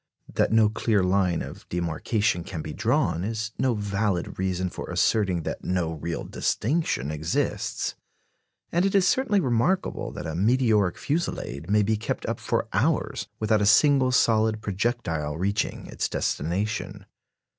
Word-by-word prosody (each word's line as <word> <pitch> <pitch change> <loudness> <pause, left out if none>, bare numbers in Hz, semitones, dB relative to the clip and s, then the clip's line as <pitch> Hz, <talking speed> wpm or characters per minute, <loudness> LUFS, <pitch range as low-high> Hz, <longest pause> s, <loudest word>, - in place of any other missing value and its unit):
That - - +2
no 110 -1 +5
clear 105 -1 +1
line 90 -2 +1
of - - -10
demarcation 90 +3 0
can 80 -3 -6
be 75 - -6
drawn 85 +3 +1
is 110 +1 -3
no 130 -3 +2
valid 100 -4 -1
reason 95 -1 -1
for - - -7
asserting 95 -6 +1
that - - -5
no 90 -3 0
real 80 +1 -4
distinction 115 - -1
exists; 80 +2 -1 0.8
and 175 +1 +2
it 195 +1 +1
is 190 -1 +4
certainly 260 -5 +2
remarkable 135 +5 0
that - - -6
a 80 - -3
meteoric 105 -1 +2
fusillade 140 - -3
may 105 0 +4
be 110 +2 +1
kept 110 - -3
up - - -2
for - - -1
hours - - 0
without 110 -1 +2
a 100 - +3
single 130 +4 +5
solid 110 -3 +3
projectile 95 -8 -2
reaching 100 +4 -1
its - - -3
destination. 100 +8 -2
105 Hz, 145 wpm, -26 LUFS, 90-115 Hz, 0.8 s, no